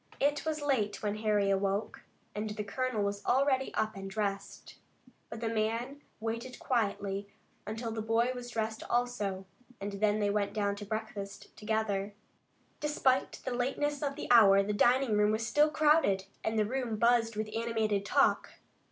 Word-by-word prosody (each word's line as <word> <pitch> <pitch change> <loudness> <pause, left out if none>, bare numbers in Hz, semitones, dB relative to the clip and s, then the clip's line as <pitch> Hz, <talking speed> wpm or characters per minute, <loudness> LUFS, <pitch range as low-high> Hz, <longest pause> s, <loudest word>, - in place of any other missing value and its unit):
It 290 +2 +1
was 310 -2 -2
late 215 -9 0
when 210 0 -1
Harry 210 -2 +2
awoke, 195 +1 -1 0.3
and 210 +1 -3
the 210 0 -4
colonel 230 +1 -1
was 200 0 -2
already 265 0 +2
up 220 0 0
and 195 0 -6
dressed. 200 -1 -4 0.5
But 225 0 -7
the 230 - -1
man 230 +5 -2 0.2
waited 230 +3 -4
quietly 200 -4 -1 0.4
until 225 +2 -4
the 220 0 -3
boy 225 +3 +1
was 245 -1 -7
dressed 220 -2 -3
also, 210 -6 -1 0.3
and 200 +1 -4
they 205 0 +1
went 205 -1 0
down 200 -1 0
to 205 - -7
breakfast 205 -2 -6
together. 210 -2 -1 0.6
Despite 275 -3 +1
the 255 - -2
lateness 285 +4 -1
of 280 -2 -2
the 300 - -6
hour 200 -4 +7
the 210 +1 -2
dining 240 +1 +3
room 210 0 +4
was 220 +1 -1
still 295 +6 +4
crowded, 300 -11 +3 0.2
and 220 0 -1
the 215 - +3
room 245 0 -2
buzzed 230 0 +3
with 215 0 -4
animated 220 -3 0
talk. 200 - +2
220 Hz, 160 wpm, -31 LUFS, 205-245 Hz, 0.6 s, hour